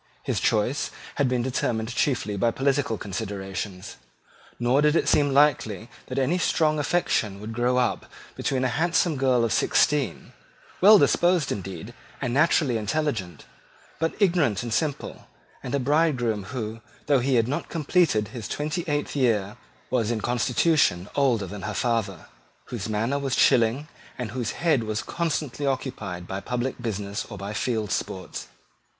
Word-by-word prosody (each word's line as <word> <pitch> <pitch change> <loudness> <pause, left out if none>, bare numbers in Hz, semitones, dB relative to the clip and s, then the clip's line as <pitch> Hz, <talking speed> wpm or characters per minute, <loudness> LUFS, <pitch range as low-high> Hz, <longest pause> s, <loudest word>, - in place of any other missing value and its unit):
His - - -1
choice 110 +6 +1 0.3
had 140 -3 +2
been 125 -1 0
determined 115 -3 -1
chiefly 120 -7 0
by 115 +4 +2
political 135 -1 0
considerations: 95 -1 -5 0.6
nor 125 +4 +3
did 150 +1 +3
it - - +2
seem 145 -1 +3
likely 125 -7 +2 0.2
that 130 - -5
any 145 +7 +1
strong 155 -3 +2
affection 130 - 0
would 110 +2 -6
grow 120 +2 +1
up 125 -1 0 0.3
between 130 -1 -1
a - - +3
handsome 170 0 +2
girl 130 -3 +2
of 115 - 0
sixteen, 140 - +1 0.5
well 210 +3 +9
disposed 175 -5 +3
indeed, 95 -4 -6 0.3
and 120 - -2
naturally 145 -3 +3
intelligent, 110 - -2 0.5
but 165 +1 0
ignorant 160 - +2
and 120 -2 -3
simple, 150 +2 -2 0.3
and 125 - -3
a - - +1
bridegroom 130 -7 +1
who, 115 -1 -5 0.2
though 140 -2 +3
he 130 +1 +1
had 115 -1 +3
not 140 - -3
completed 155 - +1
his 115 -5 -6
twenty 155 +7 -2
eighth 145 -1 -1
year, 110 -6 +1 0.4
was 120 -4 +1
in 120 -2 0
constitution 120 - +2
older 125 -8 +2
than 100 +2 -7
her 105 +2 -4
father, 115 -6 -1 0.4
whose 110 -3 -4
manner 115 +6 0
was 135 -2 -1
chilling, 125 +3 +3 0.3
and 120 -4 -4
whose 120 -2 -3
head 160 -7 +2
was 110 0 -2
constantly 150 -4 -2
occupied 110 -10 -3
by 95 - -4
public 125 +4 -3
business 105 -2 -3
or 105 - -7
by 100 +1 -5
field 110 -2 -1
sports. 95 -1 -4
125 Hz, 155 wpm, -25 LUFS, 105-145 Hz, 0.6 s, well